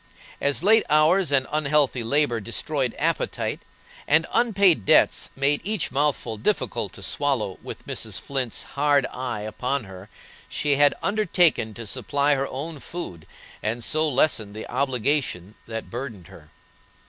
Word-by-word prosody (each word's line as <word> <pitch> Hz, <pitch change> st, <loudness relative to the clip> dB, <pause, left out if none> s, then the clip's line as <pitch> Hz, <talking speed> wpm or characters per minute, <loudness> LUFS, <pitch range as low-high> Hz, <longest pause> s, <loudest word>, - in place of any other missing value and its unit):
As 140 Hz, +1 st, +1 dB
late 220 Hz, +3 st, +5 dB
hours 155 Hz, +3 st, +4 dB
and 135 Hz, -2 st, +3 dB
unhealthy 150 Hz, -4 st, +1 dB
labor 130 Hz, 0 st, +1 dB
destroyed 125 Hz, +4 st, -2 dB
appetite, -, -, -1 dB, 0.5 s
and 160 Hz, +2 st, +4 dB
unpaid 200 Hz, -, +3 dB
debts -, -, +4 dB
made 140 Hz, +2 st, +1 dB
each 205 Hz, -, -2 dB
mouthful 135 Hz, -5 st, -1 dB
difficult 105 Hz, -, -1 dB
to -, -, -9 dB
swallow 135 Hz, -10 st, -1 dB
with -, -, -9 dB
Mrs. -, -, -2 dB
Flint's 130 Hz, -4 st, -2 dB
hard 145 Hz, -1 st, +1 dB
eye 125 Hz, -4 st, -4 dB
upon 125 Hz, +5 st, -2 dB
her, 95 Hz, 0 st, -12 dB, 0.4 s
she 145 Hz, -2 st, 0 dB
had 145 Hz, 0 st, +5 dB
undertaken 180 Hz, -, +2 dB
to 115 Hz, -, -7 dB
supply 140 Hz, +6 st, +1 dB
her 135 Hz, 0 st, -1 dB
own 145 Hz, +4 st, -6 dB
food, 90 Hz, -, -8 dB, 0.3 s
and 115 Hz, +3 st, -2 dB
so 155 Hz, +4 st, +1 dB
lessen 125 Hz, -7 st, +1 dB
the 110 Hz, -, -7 dB
obligation 130 Hz, -, 0 dB
that 115 Hz, -1 st, -6 dB
burdened 115 Hz, -7 st, -7 dB
her. 75 Hz, -1 st, -15 dB
140 Hz, 140 wpm, -24 LUFS, 115-150 Hz, 0.5 s, late